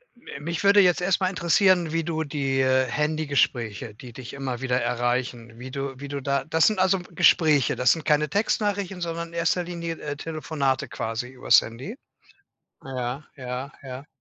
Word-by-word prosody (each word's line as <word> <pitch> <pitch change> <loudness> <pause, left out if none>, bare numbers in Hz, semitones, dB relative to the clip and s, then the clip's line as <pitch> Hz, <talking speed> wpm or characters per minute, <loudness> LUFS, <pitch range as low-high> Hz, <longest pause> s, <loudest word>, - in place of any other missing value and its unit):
M 240 - -24
äh, 140 - -7
mich 170 +5 -4
würde 200 +1 +6
jetzt 180 -1 +3
erst 190 +1 +1
mal 185 - +2
interessieren, 175 -1 +3
wie 165 0 +1
du 160 -1 -2
die, 140 -3 -1
äh, 130 0 +3
Handy-Gespräche, 135 -6 -1
die 120 +1 -11
dich 130 -1 -9
immer 135 -3 -4
wieder 125 -1 0
erreichen, 120 -1 -2
wie 130 +1 -8
du 135 -1 -5
wie 145 - -7
du 140 0 -4
da 140 +1 0
das 160 0 +3
sind 215 -3 +1
also 190 0 +3
Gespräche. 155 -5 +3
Das 125 -1 +4
sind 160 -3 -7
keine 150 0 +2
Textnachrichten, 200 0 -1
sondern 170 0 -3
in 170 - -17
1. 170 +1 +1
Linie, 170 -1 -5
äh, 145 -1 -4
Telefonate 145 -4 -2
quasi 115 +2 -4
übers 130 -1 +4
Handy. 130 - -8 0.9
Ja, 130 +2 -4
ja, 130 +2 -5
ja. 135 +1 -8
145 Hz, 180 wpm, -25 LUFS, 130-170 Hz, 0.9 s, würde